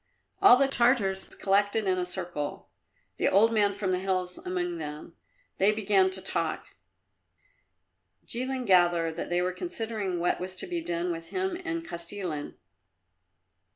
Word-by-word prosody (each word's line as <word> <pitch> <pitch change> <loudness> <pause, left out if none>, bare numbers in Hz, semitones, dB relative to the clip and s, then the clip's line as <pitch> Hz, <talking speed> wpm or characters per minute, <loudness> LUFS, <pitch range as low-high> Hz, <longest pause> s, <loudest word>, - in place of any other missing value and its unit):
All 390 -11 +8
the 275 +1 +3
Tartars 235 -7 +2
collected 205 +2 +1
in 185 -1 +1
a 180 - -1
circle, 175 -5 -4 0.5
the - - +1
old 220 +4 +4
man 205 -2 +3
from 200 -1 -2
the 180 - +1
hills 185 -1 -2
among 175 -1 -3
them. 150 +2 -7 0.4
They 195 +2 +5
began 200 -3 +2
to 190 0 -3
talk; - - -3 1.5
Jilin 255 +1 0
gathered 175 -4 +3
that - - -4
they 175 0 +1
were 180 0 -1
considering 220 - -3
what 175 - 0
was 185 +1 -5
to - - 0
be 350 -2 -3
done 175 - -2
with 165 0 -6
him 375 -1 -1
and 330 0 -3
Kostilin. 170 -3 -5
190 Hz, 150 wpm, -28 LUFS, 175-225 Hz, 1.5 s, All